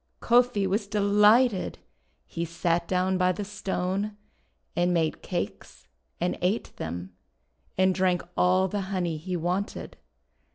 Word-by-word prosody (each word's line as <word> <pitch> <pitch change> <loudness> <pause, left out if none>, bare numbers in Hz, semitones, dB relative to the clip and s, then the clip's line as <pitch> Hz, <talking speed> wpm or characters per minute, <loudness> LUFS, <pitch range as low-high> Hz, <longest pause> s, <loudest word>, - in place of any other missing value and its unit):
Kofi 240 -4 +3
was 200 +2 0
delighted. 210 +2 +3 0.5
He 170 - -4
sat 170 0 -1
down 185 0 +1
by 180 0 +4
the 205 +3 -4
Stone, 200 0 -2 0.6
and 175 +1 +2
made 160 -2 0
cakes, 70 - -5 0.3
and 175 +1 -1
ate 190 +6 -1
them, 90 +3 -5 0.6
and 185 0 +4
drank 185 -1 +1
all 185 +1 +3
the 205 +2 -2
honey 175 -5 -1
he 180 +3 -3
wanted. 180 +5 -3
185 Hz, 125 wpm, -27 LUFS, 175-205 Hz, 0.6 s, by